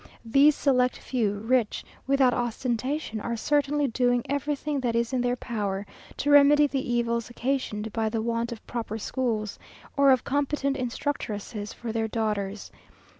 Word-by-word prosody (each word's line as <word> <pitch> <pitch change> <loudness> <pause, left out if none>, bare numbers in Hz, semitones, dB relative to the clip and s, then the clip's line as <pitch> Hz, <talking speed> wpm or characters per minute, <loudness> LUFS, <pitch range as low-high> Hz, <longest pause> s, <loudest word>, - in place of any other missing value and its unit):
These 280 +6 +5
select 250 -3 +2
few, 220 -6 -1
rich 235 -1 +1 0.2
without 270 -2 +4
ostentation, 240 +1 -2
are 235 +1 -3
certainly 290 +3 +1
doing 245 0 +1
everything 285 +1 -1
that 240 -3 -1
is 235 +2 0
in 255 - +1
their 245 0 +1
power 205 -5 -3 0.3
to 290 - 0
remedy 290 +1 +7
the 270 -3 -2
evils 235 -1 0
occasioned 240 -4 -2
by 220 -1 0
the 225 0 -2
want 230 +1 -1
of 230 - -8
proper 225 -2 -4
schools, 225 -3 -2 0.4
or 280 -1 +5
of 260 -3 +3
competent 280 0 0
instructresses 235 -5 -3
for 235 -2 -6
their 225 0 -1
daughters. 210 -3 -2
245 Hz, 150 wpm, -27 LUFS, 225-275 Hz, 0.4 s, remedy